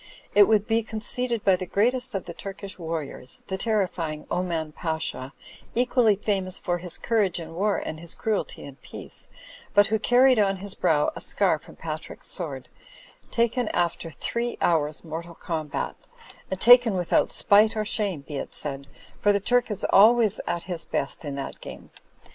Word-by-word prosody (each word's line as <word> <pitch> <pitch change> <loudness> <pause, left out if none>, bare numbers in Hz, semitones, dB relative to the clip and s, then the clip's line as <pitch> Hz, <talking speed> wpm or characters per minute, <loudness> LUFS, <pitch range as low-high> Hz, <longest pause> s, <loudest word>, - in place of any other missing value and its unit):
It 205 -1 +7
would 215 -2 +3
be 225 +1 +2
con 220 0 -6
ceded 240 0 -1
by 195 -2 +5
the 185 - -5
greatest 245 +5 0
of 195 - -3
the 170 - -7
Turkish 195 +1 -8
warriors, 160 -6 -5
the 190 - -3
ter 215 -3 +2
rifying 155 -4 -5
Oman 170 -3 -1
Pasha, 160 -5 -3 0.4
equally 245 -3 +3
famous 190 -2 -1
for 175 -1 -2
his 175 -1 -3
courage 210 -7 +1
in 165 -1 -8
war 200 +4 +1
and 155 - -5
his 170 0 -4
cruelty 220 -3 -2
in 140 -1 -10
peace; - - -10 0.5
but 205 - +7
who 220 +1 0
carried 250 +1 +5
on 195 -2 +2
his 195 +1 -7
brow 160 -6 +2
a - - -7
scar - - +1
from - - -15
Patrick's - - -7
sword, - - -3 0.6
taken 235 0 +1
after 170 -1 -1
three 235 +9 -3
hours 155 -3 +1
mortal 165 +1 -7
combat 155 -4 -3 0.3
— - - -21
^and 190 - -1
taken 240 -2 +7
without 175 -2 +1
spite 210 +2 +4
or 215 - 0
shame, 205 -7 0
be 140 +1 -7
it - - -4
said, 140 -1 -2 0.3
for 205 - +4
the 200 - +2
Turk 245 +5 +2
is 210 - -3
always 220 +1 +6
at 170 - -2
his 175 -3 -3
best 140 - -3
in 145 -2 -4
that 140 - -6
game. - - -10
195 Hz, 180 wpm, -25 LUFS, 165-220 Hz, 0.6 s, It